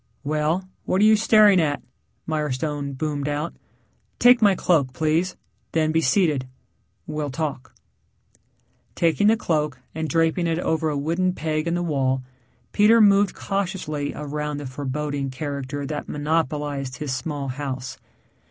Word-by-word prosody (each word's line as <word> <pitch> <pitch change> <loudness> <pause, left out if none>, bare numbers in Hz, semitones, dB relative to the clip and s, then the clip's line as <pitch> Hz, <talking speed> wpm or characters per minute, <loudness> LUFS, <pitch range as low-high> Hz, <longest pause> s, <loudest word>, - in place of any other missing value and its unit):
"Well, 155 +5 0 0.2
what 185 - +1
are - - +4
you 215 0 +7
staring 215 -3 +5
at?" 145 -2 0 0.5
Mirestone 150 -2 -2
boomed 145 -1 -2
out. 150 +3 -2 0.6
"Take 245 -1 +6
my 200 -3 +5
cloak, 145 -8 +1
please, 160 +5 0 0.4
then 155 -1 +2
be 160 +1 +2
seated. 150 -4 +2 0.6
We'll 150 -1 -3
talk." 140 -2 -4 1.2
Taking 170 +5 +2
the 225 +1 +5
cloak 150 - -1
and 160 0 -3
draping 165 +1 +1
it 165 -1 0
over 160 -2 0
a 150 - -1
wooden 170 +6 0
peg 155 -1 -2
in 170 - 0
the 175 - -1
wall, 135 -5 0 0.5
Peter 220 +2 +5
moved 200 -2 +5
cautiously 175 -7 -3
around 150 0 -4
the 145 - -6
foreboding 140 +1 -3
character 140 +1 -4
that 150 +1 -5
monopolized 145 -3 -1
his 150 -4 -3
small 140 +1 -3
house. 130 -1 -5
150 Hz, 140 wpm, -23 LUFS, 145-170 Hz, 1.2 s, you